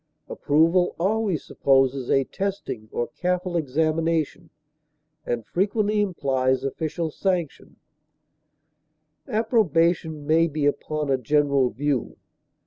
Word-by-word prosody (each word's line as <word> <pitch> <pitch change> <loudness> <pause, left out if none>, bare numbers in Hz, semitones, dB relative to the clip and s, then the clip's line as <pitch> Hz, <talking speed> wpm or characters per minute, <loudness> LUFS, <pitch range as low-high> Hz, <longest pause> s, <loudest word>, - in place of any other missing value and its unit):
Approval 165 +5 +2
always 200 -3 0
supposes 135 -1 +1
a 135 - +3
testing 190 - -5
or 120 - -2
careful 180 +5 -2
examination, 160 +1 0 0.8
and 120 -2 -2
frequently 210 +2 0
implies 130 -9 0
official 160 +4 -3
sanction; 180 -3 -3 1.5
approbation 170 - +1
may 160 +2 +3
be 150 -2 -2
upon 150 0 -1
a 135 - +2
general 140 0 +2
view. 140 +1 -2
155 Hz, 95 wpm, -24 LUFS, 135-180 Hz, 1.5 s, a